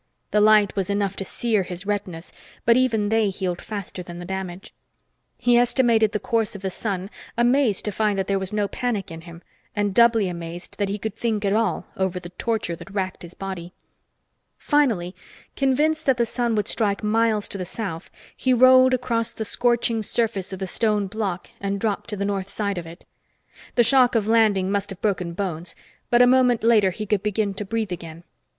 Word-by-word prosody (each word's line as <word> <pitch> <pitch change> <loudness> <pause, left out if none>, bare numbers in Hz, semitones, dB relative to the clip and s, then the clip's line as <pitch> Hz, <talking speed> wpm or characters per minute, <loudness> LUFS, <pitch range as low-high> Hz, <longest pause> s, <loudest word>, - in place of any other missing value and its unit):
The 210 - +3
light 210 -1 +5
was 195 -2 -1
enough 200 -1 0
to - - -2
sear 220 +2 0
his 180 0 -7
retinas, 190 -5 -4 0.3
but 230 - +6
even 225 -5 +2
they 220 -2 +2
healed 185 -2 -3
faster 200 -3 -6
than 175 -1 -9
the 175 - -7
damage. 190 0 -6 0.6
He 240 0 +4
estimated 235 -3 +3
the 210 - -1
course 225 -1 -1
of 200 - -9
the 190 - -2
sun, 195 -1 -4 0.3
amazed 240 -3 +2
to 210 - -1
find 210 0 0
that 190 - 0
there 195 0 0
was 190 -1 -3
no 210 -1 0
panic 215 -6 -3
in 165 0 -8
him, 170 0 -12 0.3
and 205 -2 0
doubly 230 -2 +5
amazed 170 +1 -7
that 200 -1 0
he 200 - -2
could 215 0 -5
think 220 -3 -1
at 195 - +2
all 225 +1 0
over 190 -1 -1
the 175 -1 -10
torture 205 -1 -2
that - - -11
wracked 190 -2 -3
his 175 0 -10
body. 185 -2 -6 0.8
Finally, 230 - +1 0.4
convinced 300 +4 +1
that 265 -2 +4
the 235 - +2
sun 235 0 -1
would 210 - 0
strike 205 -2 0
miles 220 0 +2
to 200 - -5
the - - -2
south, 185 -2 -5 0.3
he 255 -1 +2
rolled 255 +1 +6
across 230 -2 -1
the 220 - -5
scorching 235 0 +1
surface 215 -3 -1
of 190 - -5
the 190 - -3
stone 210 +1 +1
block 195 -3 -4
and 200 0 -2
dropped 210 -1 -2
to 210 - -2
the 200 - -1
north 195 -1 -2
side 200 -3 -2
of 165 - -8
it. 170 +3 -12 0.7
The 240 - +5
shock 250 0 +4
of 215 -2 +1
landing 215 -4 +3
must 200 0 -1
have 195 -2 -8
broken 185 -5 -1
bones, 170 -2 -4 0.3
but 240 0 +6
a - - +7
moment 250 -2 +4
later 220 -4 +5
he 215 +4 -5
could 205 -1 0
begin 210 -1 -1
to 200 - -4
breathe 220 -1 -2
again. 165 -1 -7
205 Hz, 200 wpm, -23 LUFS, 190-230 Hz, 0.8 s, a